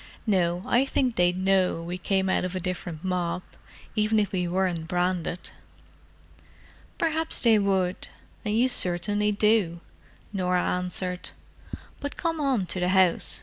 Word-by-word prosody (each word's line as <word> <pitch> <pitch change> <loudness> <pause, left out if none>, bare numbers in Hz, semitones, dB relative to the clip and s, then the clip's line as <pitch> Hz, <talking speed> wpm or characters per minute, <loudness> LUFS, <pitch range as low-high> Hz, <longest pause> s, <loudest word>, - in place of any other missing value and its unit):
"No, 180 -4 +1
I 245 +2 +3
think 260 -3 0
they'd 175 0 +2
know 190 -2 +2
we 175 +2 -5
came 190 +1 0
out 190 - +1
of 185 0 -3
a - - -1
different 175 -3 -5
mob, 180 -1 -2 0.5
even 215 0 +2
if 205 - 0
we 180 -2 -1
weren't 175 -2 -1
branded." 180 0 -2 1.5
"Perhaps 320 -1 0
they 225 -3 +5
would—and 195 +2 -2
you 245 +2 +4
certainly 205 -1 +2
do," 205 -5 +2 0.5
Norah 180 -2 0
answered. 180 0 -2 0.7
"But 285 - -6
come 330 -2 -2
on 260 -9 +1
to 185 - -2
the 180 0 +1
house. 185 -2 +3
185 Hz, 140 wpm, -26 LUFS, 180-210 Hz, 1.5 s, they